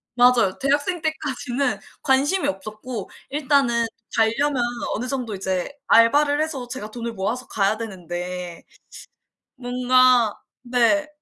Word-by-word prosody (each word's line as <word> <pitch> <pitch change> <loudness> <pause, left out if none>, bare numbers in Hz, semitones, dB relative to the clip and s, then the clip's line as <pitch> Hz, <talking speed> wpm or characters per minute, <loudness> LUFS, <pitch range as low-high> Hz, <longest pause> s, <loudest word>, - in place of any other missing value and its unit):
맞아요 245 -6 +4
대학생 290 +6 0
때까지는 280 -4 -2 0.2
관심이 290 +8 +2
없었고 215 +3 -5 0.2
일단은 270 -5 +2 0.3
갈려면 250 +4 +2 0.3
어느 245 +4 -3
정도 245 -5 -3
이제 190 +4 -2 0.2
알바를 290 +6 +5
해서 275 -6 -3
제가 230 -4 -7
돈을 235 -1 -5
모아서 225 +6 -3
가야 205 +1 +1
되는데 180 -4 -6 0.9
뭔가 250 -2 +3 0.3
네 250 +5 +2
245 Hz, 255 characters per minute, -23 LUFS, 215-275 Hz, 0.9 s, 알바를